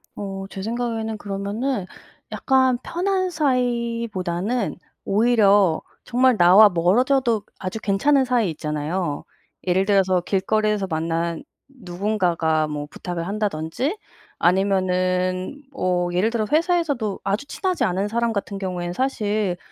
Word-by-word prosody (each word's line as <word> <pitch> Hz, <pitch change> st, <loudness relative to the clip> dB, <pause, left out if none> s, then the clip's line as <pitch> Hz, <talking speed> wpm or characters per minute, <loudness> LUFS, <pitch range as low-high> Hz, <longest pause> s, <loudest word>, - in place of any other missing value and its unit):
어 195 Hz, -1 st, -5 dB
제 195 Hz, -, -7 dB
생각에는 225 Hz, 0 st, -3 dB
그러면은 205 Hz, +3 st, -3 dB, 0.5 s
약간 260 Hz, -2 st, +2 dB
편한 370 Hz, +1 st, -1 dB
사이보다는 235 Hz, -, -1 dB, 0.3 s
오히려 205 Hz, -5 st, +4 dB, 0.2 s
정말 250 Hz, -1 st, +3 dB
나와 190 Hz, +5 st, +8 dB
멀어져도 225 Hz, +6 st, +2 dB, 0.2 s
아주 185 Hz, +3 st, -4 dB
괜찮은 265 Hz, +8 st, +2 dB
사이 240 Hz, -6 st, +1 dB
있잖아요. 150 Hz, +1 st, -3 dB, 0.4 s
예를 185 Hz, +1 st, +2 dB
들어서 190 Hz, -3 st, +3 dB
길거리에서 210 Hz, +2 st, 0 dB
만난 165 Hz, +2 st, -2 dB, 0.2 s
누군가가 180 Hz, -, -1 dB
뭐 150 Hz, -1 st, -4 dB
부탁을 175 Hz, -2 st, -5 dB
한다든지 210 Hz, -, -2 dB, 0.4 s
아니면은 185 Hz, +4 st, +1 dB
뭐 180 Hz, -6 st, -1 dB
예를 185 Hz, +5 st, +2 dB
들어 230 Hz, -2 st, -1 dB
회사에서도 310 Hz, -, +1 dB
아주 200 Hz, +8 st, -1 dB
친하지 375 Hz, -3 st, -1 dB
않은 190 Hz, +3 st, 0 dB
사람 230 Hz, +1 st, 0 dB
같은 200 Hz, -1 st, -3 dB
경우에는 180 Hz, -2 st, -3 dB
사실 210 Hz, -6 st, -1 dB
200 Hz, 290 characters per minute, -22 LUFS, 180-240 Hz, 0.5 s, 나와